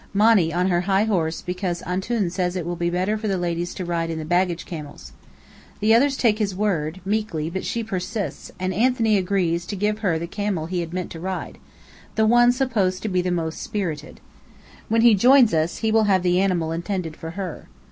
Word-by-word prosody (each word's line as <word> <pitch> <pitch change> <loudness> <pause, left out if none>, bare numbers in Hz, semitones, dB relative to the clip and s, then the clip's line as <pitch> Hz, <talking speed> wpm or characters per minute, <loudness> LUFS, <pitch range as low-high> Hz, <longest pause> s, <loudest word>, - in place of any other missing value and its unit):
Monny 205 -5 +4
on 180 +2 +1
her 175 -1 +2
high 195 +1 +4
horse 170 -7 -1
because 180 -1 -3
"Antoun" 190 +1 -1
says 180 0 -1
it 180 -3 -3
will 175 0 -3
be 170 0 -1
better 185 +5 0
for 215 - -3
the 195 -2 0
ladies 175 0 -2
to 185 - -4
ride 170 -1 -1
the 160 -1 -4
baggage 175 +1 0
camels. 150 -4 -8 0.7
The 215 +2 +4
others 270 +4 +3
take 220 -3 +2
his 200 -3 -1
word, 185 -4 -1
meekly, 195 -7 -1
but 190 +1 -4
she 235 - -2
persists, 195 - -4
and 185 +1 -1
Anthony 225 +1 +2
agrees 180 -3 0
to 205 - -4
give 210 +2 -1
her 185 -7 +1
the 165 - -4
camel 195 -2 -2
he 180 +2 -2
had 170 -1 -4
meant 180 0 -4
to 165 - -7
ride, 185 +2 -5 0.6
the 220 - +3
one 240 +2 +5
supposed 230 -8 0
to 220 - -1
be 185 -1 +1
the 180 - -2
most 165 -2 -2
spirited. 160 -8 -4 0.7
When 225 +1 +3
he 235 -1 +7
joins 245 +2 +6
us, 160 +1 0
he 220 - +2
will 220 0 +4
have 190 -3 +2
the 180 0 +3
animal 175 -4 0
intended 170 -1 -3
for 165 0 -7
her. 185 -5 -5
185 Hz, 210 wpm, -23 LUFS, 170-210 Hz, 0.7 s, he